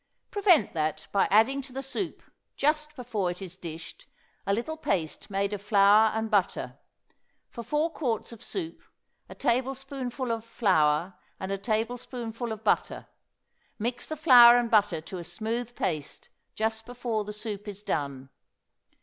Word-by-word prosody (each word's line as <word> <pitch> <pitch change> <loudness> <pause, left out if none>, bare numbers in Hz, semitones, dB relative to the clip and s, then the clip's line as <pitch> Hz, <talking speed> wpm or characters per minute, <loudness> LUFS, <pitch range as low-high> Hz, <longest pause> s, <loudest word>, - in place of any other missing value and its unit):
Prevent 390 -7 +4
that 155 0 -2
by 200 - +3
adding 230 +7 +4
to 265 - -12
the 270 +2 -5
soup, 340 +7 -4 0.3
just 300 +1 0
before 225 -8 -2
it 175 - -5
is 185 -2 -8
dished, 170 - -9 0.4
a 200 - +3
little 275 +9 -3
paste 180 - -2
made 200 +1 -1
of 205 - -4
flour 205 +1 +5
and 220 0 -2
butter. 200 -3 0 0.7
For 235 - -6
four 300 +7 0
quarts 245 -10 -2
of 230 - -11
soup 335 -4 -5 0.5
a - - -9
tablespoonful 260 0 -2
of 225 -1 -2
flour 180 -6 +2 0.3
and 190 +1 -4
a 195 - -1
tablespoonful 230 +1 -3
of 220 0 -6
butter; 215 - 0 0.7
mix 240 +3 -3
the 310 - -5
flour 245 -5 +9
and 240 -1 0
butter 205 -7 +3
to 180 +3 -7
a - - -6
smooth 225 +7 -4
paste 150 -2 -3 0.3
just 220 +1 -1
before 240 -3 -2
the 210 - -6
soup 210 -1 -6
is 205 0 -7
done. 140 -6 -3
220 Hz, 155 wpm, -28 LUFS, 195-250 Hz, 0.7 s, flour